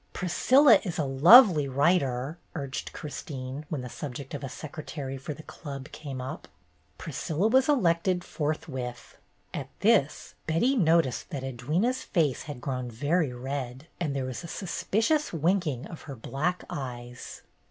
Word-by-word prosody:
"Priscilla 230 Hz, -, +5 dB
is 180 Hz, -3 st, -4 dB
a 155 Hz, -, +1 dB
lovely 160 Hz, -, +8 dB
writer," 140 Hz, 0 st, +1 dB, 0.2 s
urged 140 Hz, -3 st, -4 dB
Chris 150 Hz, -, -6 dB
tine, 135 Hz, +1 st, -6 dB
when 150 Hz, -5 st, -2 dB
the 125 Hz, -, -6 dB
subject 135 Hz, +1 st, -7 dB
of 145 Hz, -, -5 dB
a 135 Hz, -, -4 dB
secretary 145 Hz, -2 st, -6 dB
for 135 Hz, +3 st, -6 dB
the 155 Hz, -, -11 dB
Club 140 Hz, -4 st, -8 dB
came 140 Hz, -4 st, -7 dB
up. 130 Hz, +1 st, -6 dB, 0.5 s
Priscilla 160 Hz, +5 st, -1 dB
was 260 Hz, +4 st, +4 dB
elected 180 Hz, -, +2 dB
forthwith. 135 Hz, -7 st, -4 dB, 0.4 s
At -, -, -5 dB
this, -, -, +2 dB
Betty 170 Hz, +13 st, +2 dB
noticed 165 Hz, -, +2 dB
that 140 Hz, -7 st, -5 dB
Edwyna's 155 Hz, -, -1 dB
face 155 Hz, -, +1 dB
had 145 Hz, -4 st, -6 dB
grown 125 Hz, -1 st, -3 dB
very 145 Hz, +6 st, 0 dB
red, 130 Hz, +1 st, -5 dB
and 150 Hz, -5 st, -1 dB
there 135 Hz, -1 st, -1 dB
was 130 Hz, -3 st, -5 dB
a -, -, -6 dB
suspicious 220 Hz, -, 0 dB
winking 165 Hz, -5 st, 0 dB
of 165 Hz, -, -9 dB
her 135 Hz, -, -5 dB
black 145 Hz, +9 st, -2 dB
eyes. 125 Hz, -3 st, -7 dB
150 Hz, 150 wpm, -28 LUFS, 130-175 Hz, 0.5 s, lovely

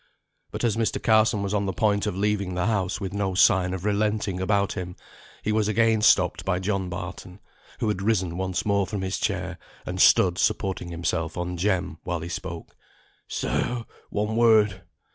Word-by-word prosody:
But -, -, -6 dB
as 115 Hz, -2 st, +1 dB
Mr. 115 Hz, -1 st, 0 dB
Carson 110 Hz, -2 st, +3 dB
was 100 Hz, 0 st, -2 dB
on 100 Hz, -1 st, 0 dB
the 95 Hz, -, -1 dB
point 100 Hz, +3 st, +1 dB
of 105 Hz, -, -2 dB
leaving 100 Hz, -2 st, -1 dB
the 90 Hz, 0 st, 0 dB
house 100 Hz, -4 st, 0 dB
with 95 Hz, -2 st, -5 dB
no 100 Hz, -2 st, -1 dB
sign 90 Hz, 0 st, +4 dB
of 95 Hz, 0 st, -5 dB
relenting 105 Hz, -2 st, 0 dB
about 100 Hz, +1 st, +1 dB
him, 90 Hz, -2 st, -6 dB, 0.5 s
he 105 Hz, -, 0 dB
was 105 Hz, -1 st, +1 dB
again 110 Hz, 0 st, +2 dB
stopped 95 Hz, -5 st, +3 dB
by 95 Hz, -2 st, 0 dB
John 95 Hz, 0 st, -2 dB
Barton, 90 Hz, +1 st, -7 dB, 0.4 s
who 115 Hz, -, 0 dB
had 105 Hz, -3 st, -1 dB
risen 95 Hz, -5 st, 0 dB
once 95 Hz, +1 st, -2 dB
more 100 Hz, -2 st, +1 dB
from 100 Hz, -3 st, -4 dB
his 95 Hz, -, -2 dB
chair, -, -, -2 dB, 0.3 s
and 90 Hz, +1 st, -2 dB
stood 90 Hz, -1 st, +5 dB
supporting 95 Hz, -3 st, 0 dB
himself 85 Hz, -1 st, -2 dB
on 90 Hz, 0 st, -3 dB
Jem, 90 Hz, -3 st, -1 dB
while 85 Hz, -2 st, -3 dB
he 85 Hz, -, -6 dB
spoke. 85 Hz, -2 st, -6 dB, 0.5 s
"Sir, 115 Hz, -, -2 dB, 0.2 s
one 105 Hz, +1 st, -2 dB
word! 110 Hz, -4 st, +4 dB
95 Hz, 180 wpm, -25 LUFS, 90-105 Hz, 0.5 s, stood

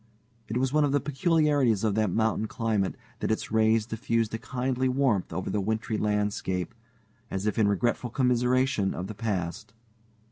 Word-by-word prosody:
It 115 Hz, -, -2 dB
was 130 Hz, +1 st, 0 dB
one 155 Hz, 0 st, +4 dB
of 140 Hz, -1 st, +1 dB
the 145 Hz, -, +4 dB
peculiarities 145 Hz, -, +2 dB
of 110 Hz, -2 st, +2 dB
that 110 Hz, -1 st, +1 dB
mountain 110 Hz, +2 st, 0 dB
climate 110 Hz, -4 st, -1 dB, 0.2 s
that -, -, -2 dB
its 110 Hz, -, -2 dB
rays 110 Hz, 0 st, +3 dB
diffused 115 Hz, -1 st, -1 dB
a 115 Hz, -, -2 dB
kindly 130 Hz, +1 st, -1 dB
warmth 130 Hz, -7 st, +1 dB
over 90 Hz, +3 st, -3 dB
the 105 Hz, -, 0 dB
wintry 110 Hz, +2 st, -1 dB
landscape, 105 Hz, -3 st, -1 dB, 0.6 s
as 95 Hz, +1 st, -3 dB
if 105 Hz, +2 st, 0 dB
in 105 Hz, -, +4 dB
regretful 120 Hz, +4 st, 0 dB
commiseration 125 Hz, -3 st, +1 dB
of 90 Hz, -, -4 dB
the 110 Hz, -, -6 dB
past. 100 Hz, -5 st, -3 dB
110 Hz, 170 wpm, -27 LUFS, 105-130 Hz, 0.6 s, one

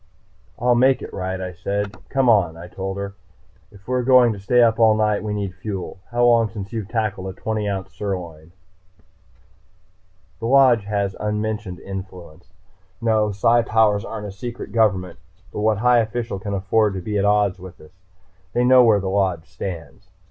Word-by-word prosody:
"I'll 125 Hz, +1 st, +2 dB
make 130 Hz, +2 st, +3 dB
it -, -, -9 dB
right," 95 Hz, 0 st, -3 dB
I 90 Hz, -1 st, -5 dB
said. 100 Hz, +4 st, -3 dB
"Come 135 Hz, -2 st, +1 dB
on," 95 Hz, -8 st, +3 dB
I 85 Hz, +1 st, -9 dB
told 95 Hz, +2 st, -5 dB
her. 100 Hz, 0 st, -5 dB, 0.6 s
"If 100 Hz, -2 st, -18 dB
we're 125 Hz, 0 st, 0 dB
going 125 Hz, -2 st, +5 dB
to 100 Hz, -, -9 dB
stay 120 Hz, +5 st, +3 dB
up 115 Hz, -1 st, +2 dB
all 110 Hz, -1 st, +5 dB
night, 105 Hz, -1 st, +1 dB
we 105 Hz, -, -3 dB
need 100 Hz, -2 st, -3 dB
fuel. 95 Hz, -1 st, -6 dB
How 120 Hz, 0 st, +2 dB
long 115 Hz, -2 st, +4 dB
since 100 Hz, 0 st, -8 dB
you've 110 Hz, -4 st, -4 dB
tackled 110 Hz, -4 st, -2 dB
a 95 Hz, -, -8 dB
twenty 110 Hz, -2 st, -2 dB
ounce 95 Hz, -1 st, -5 dB
sirloin?" 85 Hz, -5 st, -6 dB, 1.9 s
The 115 Hz, -, -3 dB
Lodge 125 Hz, -5 st, +5 dB
has 100 Hz, -2 st, -2 dB
unmentioned 105 Hz, -3 st, -3 dB
influence. 90 Hz, -3 st, -9 dB, 0.5 s
No, 110 Hz, -2 st, +1 dB
Psi 115 Hz, +4 st, +3 dB
powers 110 Hz, -3 st, +2 dB
aren't 105 Hz, 0 st, -6 dB
a 100 Hz, -, -6 dB
secret 120 Hz, +5 st, -7 dB
government. 95 Hz, -6 st, +1 dB, 0.3 s
But -, -, -4 dB
what 110 Hz, 0 st, +2 dB
high 120 Hz, +2 st, +4 dB
official 115 Hz, -2 st, -3 dB
can 100 Hz, 0 st, -4 dB
afford 100 Hz, +1 st, +1 dB
to 95 Hz, -, -4 dB
be 105 Hz, +2 st, -2 dB
at -, -, +1 dB
odds 105 Hz, -2 st, +2 dB
with 90 Hz, -1 st, -11 dB
us? 75 Hz, -, -16 dB, 0.6 s
They 120 Hz, -, +2 dB
know 125 Hz, 0 st, +6 dB
where 110 Hz, -3 st, +4 dB
the 95 Hz, -, -4 dB
Lodge 95 Hz, -4 st, 0 dB
stands. 85 Hz, -5 st, -8 dB
105 Hz, 180 wpm, -21 LUFS, 95-115 Hz, 1.9 s, know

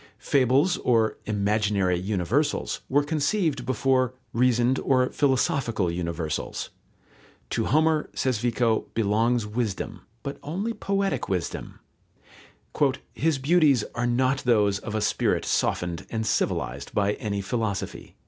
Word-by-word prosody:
Fables 140 Hz, +6 st, +2 dB
or 115 Hz, -3 st, +2 dB
"imaginary 100 Hz, -3 st, +1 dB
universals" 105 Hz, -, -1 dB
were 145 Hz, +2 st, +3 dB
conceived 150 Hz, -, 0 dB
before 130 Hz, -1 st, +1 dB, 0.2 s
"reasoned 125 Hz, +1 st, +3 dB
or 130 Hz, -1 st, +2 dB
philosophical 130 Hz, -, +1 dB
universals." 85 Hz, -2 st, -3 dB, 0.8 s
To -, -, 0 dB
Homer, 155 Hz, +2 st, +2 dB
says 130 Hz, -5 st, 0 dB
Vico, 115 Hz, -1 st, +1 dB
belongs 115 Hz, +2 st, +2 dB
wisdom, 105 Hz, -2 st, -3 dB, 0.2 s
but 140 Hz, -, -5 dB
only 195 Hz, +10 st, -3 dB
poetic 200 Hz, -2 st, -1 dB
wisdom. 90 Hz, -3 st, -4 dB, 1.3 s
"His 160 Hz, -1 st, +1 dB
beauties 145 Hz, -4 st, +4 dB
are 120 Hz, +1 st, -1 dB
not 130 Hz, +3 st, +2 dB
those 105 Hz, -6 st, +2 dB
of 110 Hz, 0 st, -6 dB
a 110 Hz, -, 0 dB
spirit 105 Hz, -, +1 dB
softened 85 Hz, -2 st, -1 dB
and 110 Hz, -1 st, -2 dB
civilized 70 Hz, -, -1 dB
by 100 Hz, 0 st, +2 dB
any 100 Hz, -2 st, -3 dB
philosophy." 105 Hz, -1 st, -3 dB
120 Hz, 115 wpm, -26 LUFS, 105-140 Hz, 1.3 s, beauties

